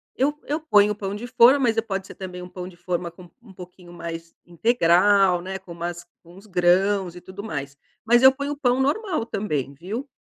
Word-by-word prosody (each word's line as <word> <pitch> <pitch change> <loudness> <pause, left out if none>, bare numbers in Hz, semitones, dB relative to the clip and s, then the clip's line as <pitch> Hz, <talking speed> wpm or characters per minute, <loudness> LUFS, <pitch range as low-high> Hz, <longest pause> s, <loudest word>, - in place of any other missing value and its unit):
eu 290 +3 0
eu 300 +3 -2
ponho 210 -9 +4
o - - -3
pão 200 -1 -5
de 230 +4 -6
forma, 250 +2 +6
mas 225 -4 +2
pode 195 -3 -4
ser - - -11
também 180 -1 -8
um 180 - -9
pão 180 0 -7
de 180 - -12
forma 175 -1 -3
com 175 0 -15
um 205 -5 -16
pouquinho 180 -1 -13
mais 165 -1 -8
integral, 185 -1 +3
né, 190 +1 -5
com 190 -2 -14
umas 175 0 -6 0.2
com 170 +1 -17
uns 200 +3 -15
grãos 185 0 +2
e 180 - -10
tudo 190 +2 -9
mais. 140 -7 -6 0.3
Mas 240 +2 +4
eu 265 0 +9
ponho 285 +1 -4
o 290 - -5
pão 255 -1 +1
normal 310 - -1
também, 150 - -3
viu? 210 - -6
190 Hz, 215 wpm, -23 LUFS, 175-235 Hz, 0.3 s, eu